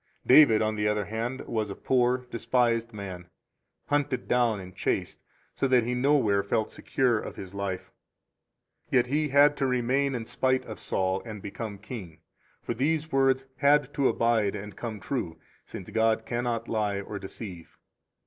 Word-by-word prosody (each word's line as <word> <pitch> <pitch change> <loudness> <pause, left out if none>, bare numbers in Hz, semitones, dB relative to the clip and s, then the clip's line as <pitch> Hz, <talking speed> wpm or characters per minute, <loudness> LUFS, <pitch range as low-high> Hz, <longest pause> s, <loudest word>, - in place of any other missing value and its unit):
46 - - -39
David, 125 -5 +7
on 110 0 0
the 105 0 0
other 105 -1 0
hand, 115 +5 -3
was 110 -2 -2
a 100 - -5
poor, 125 0 +1
despised 115 0 +1
man, 95 -4 -7 0.6
hunted 140 -4 -1
down 120 -4 +2
and 95 -1 -10
chased, - - -2 0.3
so 135 - 0
that 125 -2 +4
he 120 +2 -1
nowhere 125 -6 +3
felt 105 +2 -1
secure 125 -4 +1
of - - -7
his 95 -1 -9
life; 100 -2 -4 1.0
yet 125 -2 +3
he 150 +4 0
had 145 +1 +5
to 135 - +1
remain 130 +2 +1
in 115 -2 -4
spite 130 +2 0
of 110 - -8
Saul, 95 0 -1
and 110 -3 -7
become 100 +1 -6
king. 100 -6 -9 0.4
For - - -2
these 155 +4 0
words 135 -1 +2
had 145 0 +3
to 140 -2 +2
abide 115 -3 +1
and 105 0 -7
come 115 -3 -5
true, 95 - -3 0.3
since 95 - -9
God 110 0 +2
cannot 120 -1 -2
lie 105 -3 0
or 100 +1 -6
deceive. 95 -3 -9
115 Hz, 170 wpm, -27 LUFS, 105-130 Hz, 1.0 s, David